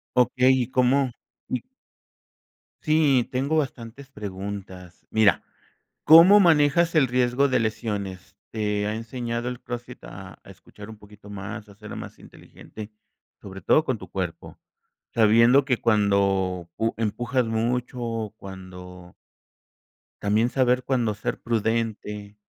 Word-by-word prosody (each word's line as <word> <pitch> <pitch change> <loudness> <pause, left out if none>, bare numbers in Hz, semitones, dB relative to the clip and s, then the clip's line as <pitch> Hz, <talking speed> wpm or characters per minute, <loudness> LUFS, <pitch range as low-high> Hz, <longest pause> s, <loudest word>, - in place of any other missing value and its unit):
Okey, 125 +1 +4
¿y - - -6
cómo? 130 +1 +2 0.4
Y - - -2 1.2
Sí, 145 -6 +2
tengo 135 +4 -1
bastantes 135 -2 -4
preguntas. 95 -4 -8
Mira, 110 -3 +3 0.6
¿cómo 175 +6 +8
manejas 165 -1 +3
el 145 -5 +4
riesgo 125 +2 +2
de 130 - +1
lesiones? 105 -4 -4
¿Te 105 -2 -2
ha 105 - -2
enseñado 120 +1 -4
el 125 - -8
CrossFit, 120 0 -8
a - - -11
a - - -15
escuchar 105 0 -14
un 110 - -10
poquito 105 0 -16
más, 105 +1 -7
a 100 - -15
ser 105 +1 -10
más - - -9
inteligente? 110 0 -12 0.5
Sobre 95 -1 -9
todo 155 - +3
con 130 -7 -2
tu 95 - -11
cuerpo, 90 -3 -6 0.5
sabiendo 115 +5 +5
que 130 -3 +2
cuando 100 -4 +1
pu 115 0 -1
empujas 120 +4 -1
mucho, 120 +3 -2
o 115 -2 -3
cuando 90 -2 -11 1.1
también, 105 +4 +2
saber 125 -1 +1
cuándo 120 -5 0
ser 100 - -4
prudente 110 -2 -2
115 Hz, 130 wpm, -24 LUFS, 100-125 Hz, 1.2 s, cómo